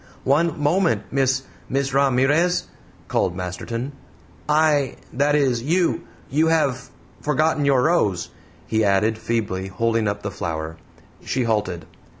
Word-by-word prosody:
"One 150 +4 +2
moment, 150 - +2
Miss 135 -1 +1 0.3
Miss 135 0 -1
Ramirez," 140 +6 +3 0.4
called 90 - 0
Masterton. 105 +8 -4 0.6
"I 150 -3 +3 0.2
that 145 +3 +2
is 130 -5 +2
you 170 +7 0 0.2
you 155 +4 +2
have 140 -6 +1 0.3
forgotten 150 0 +1
your 135 -3 +4
rose," 105 - +1 0.4
he 110 0 +1
added, 105 +2 +2
feebly, 100 -6 -2
holding 115 +3 0
up 100 0 -2
the 100 - -3
flower. 80 -3 -4 0.5
She 130 - -1
halted. 105 -7 -1
130 Hz, 125 wpm, -22 LUFS, 105-145 Hz, 0.6 s, your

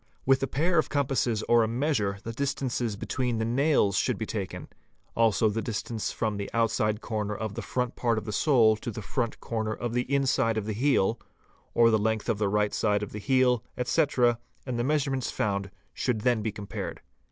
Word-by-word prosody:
With 135 0 +4
a 135 - 0
pair 165 +6 +1
of - - 0
compasses 130 -6 0
or 120 0 +4
a 110 - +2
measure 115 -5 0
the 115 - -5
distances 125 -4 -1
between 125 +3 -2
the 110 - 0
nails 125 -4 +2
should - - +1
be - - -3
taken, - - -5 0.5
also 115 -1 +3
the 110 +2 -1
dis 110 -2 -3
tance 115 -3 -3
from 110 -2 -2
the 100 - -4
outside 110 -2 +1
corner 105 -2 -2
of 110 0 -4
the - - -4
front 125 -1 -2
part 115 -2 +1
of 110 - -3
the 110 - -4
sole 115 -2 +4
to 115 - -6
the 110 -1 -6
front 115 +3 -2
eorner 110 -2 -2
of 120 -1 -3
the 125 +2 -1
inside 130 -5 +2
of 105 - -2
the 110 - -2
heel, 120 -2 +2 0.6
or 115 -1 +6
the 110 - +3
length 110 +1 -1
of 110 -3 0
the 105 -2 +1
right 105 0 +1
side 105 -1 +1
of 105 - -6
the 105 - -6
heel, 125 0 +2
etc., 125 -3 +2 0.3
and 125 -3 -3
the - - +1
measurements 135 -2 0
found 100 -1 -1 0.2
should 120 -4 -1
then 120 -1 +2
be 110 0 -2
compared. 100 0 -6
115 Hz, 210 wpm, -28 LUFS, 105-130 Hz, 0.6 s, or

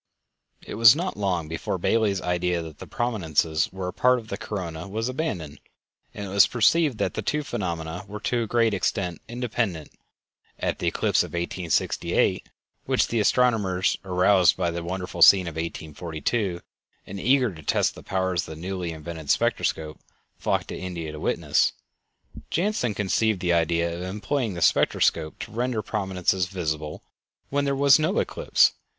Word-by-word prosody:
It - - -7
was 115 +1 +9
not 180 +4 -3
long 90 -6 -1
before 80 +3 -3
Bailey's 100 0 +1
idea 90 -1 0
that 80 -3 -10
the - - -9
prominences 80 -9 0
were 95 -1 -4
a - - -7
part 125 +4 +3
of 110 -2 -9
the - - -2
corona 85 -4 -5
was 110 +4 -3
abandoned, 110 - -4 0.5
and 105 - -6
it - - -7
was 100 +1 +5
perceived 135 +3 +3
that - - -1
the - - -3
two 150 0 -1
phenomena 85 - -4
were 105 +2 -7
to 120 +1 0
a 115 - -2
great 115 -1 +2
extent 90 -3 -1
independent. 115 -9 -3 0.7
At - - -2
the - - -1
eclipse - - +2
of - - -5
1868, 85 0 0 0.4
which - - +2
the 115 - 0
astronomers, 105 -5 +2
aroused 90 0 +4
by 90 -2 0
the 85 0 -4
wonderful 90 0 -5
scene 95 +1 +8
of 85 - -5
1842, 85 +4 -3 0.4
and 100 +1 -7
eager 125 -1 +3
to 80 - -11
test - - +1
the - - -12
powers 95 -2 -1
of 80 - -7
the - - -12
newly 90 0 -4
invented 80 -1 -8
spectroscope, 75 -1 0 0.4
flocked - - -1
to - - -4
India 85 -4 -5
to 75 - -8
witness, - - +1 0.8
Janssen 170 - 0
conceived 105 +1 +1
the 90 -1 +1
idea 85 0 +1
of 85 - -6
employing 105 +4 -2
the 85 - -1
spectroscope 80 -1 +2
to - - -7
render 120 +1 -1
the 105 - -1
prominences 95 -3 0
visible 75 -5 -4 0.5
when 140 0 +1
there 140 0 0
was 140 +2 +6
no 160 +6 0
eclipse. - - +3
95 Hz, 170 wpm, -25 LUFS, 85-115 Hz, 0.8 s, was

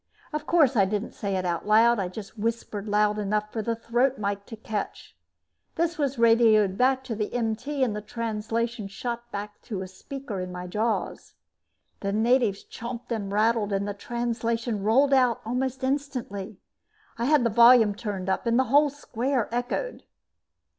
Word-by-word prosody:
Of 300 0 -3
course 300 -7 +4
I 200 -3 +5
didn't 210 +3 -2
say 200 -2 -3
it 185 -1 -1
out 175 +2 -2
loud, 225 +1 +5
just 200 +2 -9
whispered 220 -2 -3
loud 210 0 +2
enough 210 +1 -1
for 225 - -1
the 230 +2 -1
throat 245 +4 +1
mike 200 -1 -3
to 225 - -7
catch. 215 -2 -5 0.6
This 335 0 -1
was 280 -3 0
radioed 225 -4 +5
back 260 +3 +2
to 255 -3 -4
the 210 -1 -3
MT 245 +5 -1
and 225 -5 0
the 210 - -4
translation 225 0 -3
shot 235 +4 -5
back 205 0 -6
to 200 -6 -5
a - - -7
speaker 245 +2 -7
in 185 0 -4
my 180 0 -6
jaws. 215 +5 -2 0.6
The 200 - -2
natives 220 -1 +2
chomped 235 +1 -8
and 205 -4 -2
rattled 215 0 +2
and 200 +1 0
the 205 - -2
translation 230 0 -2
rolled 265 +7 +3
out 250 -4 +4
almost 260 +3 -2
instantly. 255 -8 -3 0.6
I 235 - 0
had 295 -1 +4
the 235 - +1
volume 235 -1 +7
turned 200 -3 -5
up 190 +5 -1
and 235 0 +3
the 260 - +4
whole 290 +1 +6
square 260 -3 -2
echoed. 245 - -2
230 Hz, 170 wpm, -26 LUFS, 205-250 Hz, 0.6 s, volume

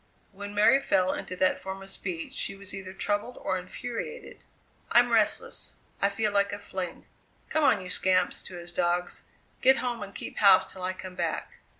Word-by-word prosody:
When 205 +1 -8
Mary 215 +6 +6
fell 185 -7 +2
into 185 - -5
that 185 0 +2
form 190 0 -6
of 195 - -9
speech 180 -4 -5
she 195 - 0
was 195 -1 -8
either 195 -1 -6
troubled 205 +5 -2
or 185 - -1
infuriated. 240 - -7 0.5
"I'm - - +5
restless; - - +1 0.3
I 200 - +4
feel 210 +1 0
like 200 0 +2
a 205 - -3
fling. 185 -3 -6 0.4
Come 315 0 +1
on, 215 -8 +4
you 180 - -8
scamps!" 185 -1 +2
to 185 - -9
his 175 0 -5
dogs, 175 +1 0 0.4
"get 265 +1 +6
home 240 -2 -2
and 200 -1 -7
keep - - -6
house 195 -3 +6
till 185 - -10
I 185 +1 -1
come 185 0 -8
back." - - -3
195 Hz, 190 wpm, -28 LUFS, 185-205 Hz, 0.5 s, Mary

